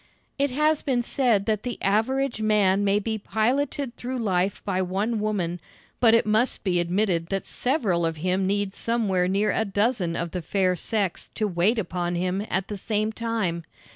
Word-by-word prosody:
It 280 Hz, 0 st, +2 dB
has 300 Hz, +3 st, +2 dB
been 250 Hz, -3 st, 0 dB
said 235 Hz, -6 st, +1 dB
that 215 Hz, -2 st, 0 dB
the 245 Hz, 0 st, -5 dB
average 235 Hz, +5 st, 0 dB
man 205 Hz, -2 st, +3 dB
may 200 Hz, 0 st, +3 dB
be 220 Hz, +1 st, -2 dB
piloted 250 Hz, +5 st, -1 dB
through 255 Hz, +1 st, -4 dB
life 195 Hz, -4 st, -1 dB
by 190 Hz, -2 st, 0 dB
one 200 Hz, +5 st, -1 dB
woman, 190 Hz, -5 st, -1 dB, 0.4 s
but 230 Hz, -2 st, +6 dB
it 230 Hz, -, +3 dB
must 220 Hz, +4 st, +1 dB
be 180 Hz, -3 st, +1 dB
admitted 175 Hz, -1 st, 0 dB
that 195 Hz, +1 st, -2 dB
several 225 Hz, -, 0 dB
of 165 Hz, -1 st, -1 dB
him 185 Hz, +3 st, 0 dB
need 200 Hz, 0 st, 0 dB
somewhere 205 Hz, -7 st, 0 dB
near 200 Hz, +3 st, +1 dB
a -, -, +1 dB
dozen 205 Hz, -4 st, 0 dB
of 170 Hz, -1 st, -3 dB
the 180 Hz, -, -3 dB
fair 185 Hz, +2 st, +1 dB
sex 195 Hz, +1 st, -2 dB
to 215 Hz, -, 0 dB
wait 190 Hz, +5 st, +1 dB
upon 175 Hz, -3 st, -2 dB
him 185 Hz, +3 st, -1 dB
at 190 Hz, +1 st, -1 dB
the 205 Hz, -, -5 dB
same 215 Hz, +1 st, -1 dB
time. 220 Hz, -7 st, -2 dB
205 Hz, 180 wpm, -25 LUFS, 185-230 Hz, 0.4 s, but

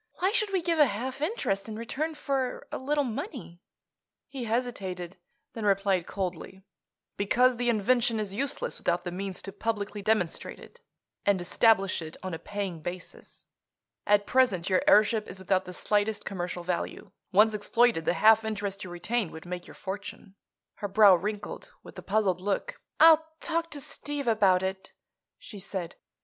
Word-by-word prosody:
Why 375 Hz, +2 st, +1 dB
should 430 Hz, -3 st, 0 dB
we 375 Hz, -3 st, 0 dB
give 330 Hz, -1 st, +1 dB
a 295 Hz, -, +7 dB
half 255 Hz, +6 st, -4 dB
interest 230 Hz, -, -1 dB
in 215 Hz, -, -5 dB
return 280 Hz, +8 st, -3 dB
for 270 Hz, -4 st, -2 dB
a -, -, -3 dB
little 290 Hz, +2 st, +1 dB
money?" 240 Hz, -, -6 dB, 0.7 s
He 260 Hz, -4 st, -5 dB
hesitated; 195 Hz, -7 st, -3 dB, 0.4 s
then 225 Hz, -, -6 dB
replied 195 Hz, -3 st, +2 dB
coldly: 190 Hz, 0 st, -5 dB, 0.5 s
"Because 250 Hz, +5 st, +3 dB
the 240 Hz, 0 st, 0 dB
invention 230 Hz, +1 st, +2 dB
is 205 Hz, -2 st, -3 dB
useless 270 Hz, +6 st, -2 dB
without 175 Hz, 0 st, 0 dB
the 175 Hz, -, -4 dB
means 190 Hz, +1 st, -4 dB
to 195 Hz, -, -6 dB
publicly 205 Hz, 0 st, -3 dB
demonstrate 200 Hz, -5 st, 0 dB
it, -, -, -15 dB, 0.4 s
and 200 Hz, -2 st, +3 dB
establish 195 Hz, +1 st, +3 dB
it 160 Hz, 0 st, -8 dB
on 185 Hz, -2 st, -4 dB
a 165 Hz, -, -4 dB
paying 195 Hz, -3 st, -4 dB
basis. 175 Hz, +2 st, -8 dB, 0.6 s
At 205 Hz, 0 st, +4 dB
present 200 Hz, -9 st, +2 dB
your 185 Hz, -, +4 dB
airship 215 Hz, +1 st, +5 dB
is 185 Hz, -, -8 dB
without 190 Hz, 0 st, 0 dB
the 180 Hz, -, -7 dB
slightest 210 Hz, +3 st, 0 dB
commercial 175 Hz, -2 st, -4 dB
value. 175 Hz, 0 st, -3 dB, 0.2 s
Once 215 Hz, +3 st, +5 dB
exploited, 215 Hz, -3 st, +2 dB
the -, -, +2 dB
half 220 Hz, +5 st, +6 dB
interest 205 Hz, -2 st, -3 dB
you 185 Hz, -, -7 dB
retain 175 Hz, +3 st, -2 dB
would 160 Hz, -, -10 dB
make 175 Hz, 0 st, -6 dB
your -, -, -12 dB
fortune." 195 Hz, 0 st, -7 dB, 0.4 s
Her 205 Hz, -, -3 dB
brow 200 Hz, 0 st, +7 dB
wrinkled 205 Hz, +4 st, -3 dB
with -, -, -13 dB
a -, -, -7 dB
puzzled 195 Hz, -3 st, +1 dB
look. 205 Hz, -, -2 dB, 0.2 s
"I'll 320 Hz, 0 st, +8 dB, 0.2 s
talk 335 Hz, 0 st, -1 dB
to 295 Hz, -2 st, -4 dB
Steve 285 Hz, 0 st, -5 dB
about 195 Hz, -5 st, +4 dB
it," 190 Hz, 0 st, -4 dB, 0.4 s
she 205 Hz, -, -10 dB
said. 190 Hz, -3 st, -5 dB
205 Hz, 165 wpm, -28 LUFS, 185-245 Hz, 0.7 s, I'll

